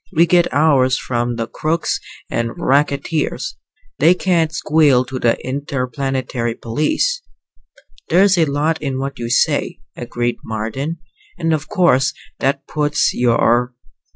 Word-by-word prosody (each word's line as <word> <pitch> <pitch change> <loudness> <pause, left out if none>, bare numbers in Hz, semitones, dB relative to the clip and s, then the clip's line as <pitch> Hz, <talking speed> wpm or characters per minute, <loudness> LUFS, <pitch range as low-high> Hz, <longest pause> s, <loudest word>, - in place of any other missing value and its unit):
We 170 -2 +4
get 175 0 +3
ours 135 -3 +3
from 120 -1 -2
the 115 -1 -2
crooks 155 +6 -1 0.3
and 115 0 -3
racketeers. 145 +2 0 0.5
They 165 +5 +5
can't 170 -4 +1
squeal 150 -6 +3
to 130 +1 -5
the 115 -1 +2
Interplanetary 130 -3 -2
Police." 155 - -1 0.9
"There's 190 +2 +5
a 170 -3 +3
lot 150 +3 -1
in 135 -3 -2
what 135 0 -4
you 120 -1 -4
say," 120 - +1 0.2
agreed 120 0 -3
Marden. 115 +9 -4 0.4
"And 165 -2 0
of 155 - -3
course 140 -9 +2 0.2
that 135 +1 0
puts 150 -1 0
your 120 0 +2
140 Hz, 125 wpm, -18 LUFS, 125-160 Hz, 0.9 s, They